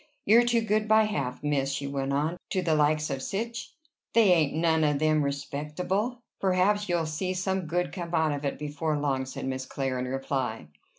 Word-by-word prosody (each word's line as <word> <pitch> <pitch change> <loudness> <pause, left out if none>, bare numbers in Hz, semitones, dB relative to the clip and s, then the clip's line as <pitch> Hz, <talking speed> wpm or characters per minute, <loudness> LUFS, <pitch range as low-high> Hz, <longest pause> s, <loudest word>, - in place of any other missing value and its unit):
"You're 230 +4 +6
too 235 -1 +3
good 215 0 0
by 220 0 +6
half, 140 -13 -3
miss," 140 -2 0
she 140 0 -3
went 140 -1 -2
on, 150 +5 0
"to 185 - 0
the 165 -2 +2
likes 150 0 +2
of 135 -1 -3
sich. 230 - -4 0.4
They 220 -5 +6
ain't 155 -4 +2
none 160 -1 +2
of 150 -1 +2
them 155 +1 +2
respectable." 150 - -2 0.2
"Perhaps 195 +2 +2
you'll 170 -2 +1
see 180 +4 -2
some 190 -1 -1
good 175 +2 -1
come 175 -2 -4
out 160 -1 +2
of 145 0 -3
it 140 - -2
before 150 +1 -2
long," 135 -2 -1
said 130 - -6
Miss 130 0 -3
Clare 135 -2 -2
in 125 - -2
reply. 130 - -3
155 Hz, 195 wpm, -28 LUFS, 140-185 Hz, 0.4 s, You're